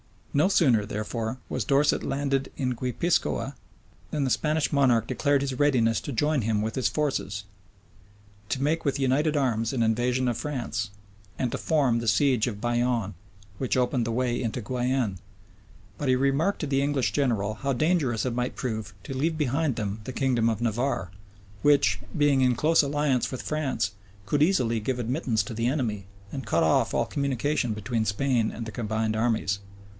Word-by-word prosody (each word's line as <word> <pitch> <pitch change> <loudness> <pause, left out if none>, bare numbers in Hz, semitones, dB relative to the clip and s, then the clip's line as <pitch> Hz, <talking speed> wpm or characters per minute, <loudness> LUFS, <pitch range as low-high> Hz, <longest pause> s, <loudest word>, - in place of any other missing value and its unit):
No 150 +5 +4
sooner, 130 - +4
therefore, 110 +3 -3
was - - -2
Dorset 145 0 +3
landed 135 -1 -1
in 130 -2 -1
Guipiscoa, 130 +3 -1 0.6
than 150 - -1
the 130 - 0
Spanish 155 +2 +1
monarch 125 -6 +3
declared 145 +3 +1
his 135 -2 -2
readiness 125 -6 +3
to - - -5
join 150 +3 +1
him 110 -1 0
with 110 +1 -2
his 130 - +1
forces, 135 -9 -1 1.0
to 135 +4 -1
make 160 +3 0
with 140 -1 +1
united 140 +3 +1
arms 115 -5 +1
an 120 -3 +1
invasion 120 +3 +1
of 120 - -2
France, 120 -8 -3 0.5
and 125 -3 -1
to - - -2
form 135 -7 +2
the 115 - -4
siege 125 +2 +3
of 105 -4 -5
Bayonne, 120 -3 0 0.5
which 130 - 0
opened 125 -1 +1
the - - -1
way 120 0 0
into 120 +1 -2
Guienne:[*] 125 -3 -1 0.8
but 145 - -2
he 130 - +4
remarked 140 +9 +1
to - - -1
the 135 -1 +1
English 140 -7 +1
general 110 -5 0
how 135 +5 -1
dangerous 140 - +1
it 125 - -1
might 125 +1 -2
prove 110 -5 -4
to - - -6
leave 155 +5 0
behind 145 -1 0
them 105 0 -3
the 130 - -5
kingdom 120 -4 +2
of 110 -1 -2
Navarre, 120 -5 -1 0.5
which, 105 -9 +4 0.2
being 145 -2 +4
in 125 -1 +3
close 160 +6 +4
alliance 140 -3 0
with 130 - -5
France, 140 - -1 0.3
could 145 +9 0
easily 125 -10 +3
give 125 +4 -2
admittance 120 -3 0
to 100 - -7
the 115 +2 0
enemy, 115 -8 -1 0.3
and 135 -5 -6
cut 85 -4 +2
off 80 - +2
all - - +2
communication 140 -3 -1
between 110 +1 -2
Spain 115 +2 +1
and 115 - -6
the 110 - -6
combined 110 0 -1
armies. 110 -3 0
125 Hz, 175 wpm, -26 LUFS, 110-140 Hz, 1.0 s, No